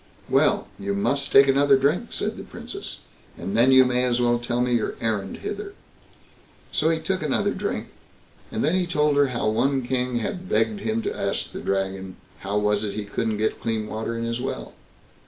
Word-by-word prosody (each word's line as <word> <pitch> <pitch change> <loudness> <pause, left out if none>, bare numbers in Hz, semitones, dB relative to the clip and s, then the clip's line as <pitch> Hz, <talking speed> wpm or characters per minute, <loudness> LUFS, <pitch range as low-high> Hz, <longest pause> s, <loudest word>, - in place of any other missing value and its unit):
"Well! - - +3
you 100 0 -2
must 140 +8 0
take 135 0 +8
another 140 0 +5
drink", 150 - +1
said - - -2
the - - -7
Princess, - - -7 0.4
"and 95 - -4
then 120 +3 +5
you 130 0 +8
may 125 0 +1
as 125 -1 +1
well 120 -1 +2
tell 120 0 -2
me 125 0 +1
your 115 -2 0
errand 105 -4 -2
hither." 410 -1 -5 1.0
So 155 - +2
he 165 - +2
took 190 +1 -2
another 150 -3 +1
drink, - - -3 0.6
and 110 - -1
then 155 - +2
he 185 -1 +1
told 150 -3 +2
her 145 -1 +4
how 120 -4 -2
one 130 +5 +1
king 125 0 -1
had 185 - -3
begged 210 0 +1
him 220 +2 -1
to - - -2
ask 100 - -2
the - - -6
Dragon, 95 -1 -2 0.2
how 100 +1 -2
it - - +2
was 105 0 +2
he 105 0 -3
couldn't 110 +1 -2
get 110 +1 -1
clean 110 -2 -1
water 110 +2 -4
in 115 - -3
his 115 +1 -2
well? 130 - -4
125 Hz, 200 wpm, -24 LUFS, 110-145 Hz, 1.0 s, take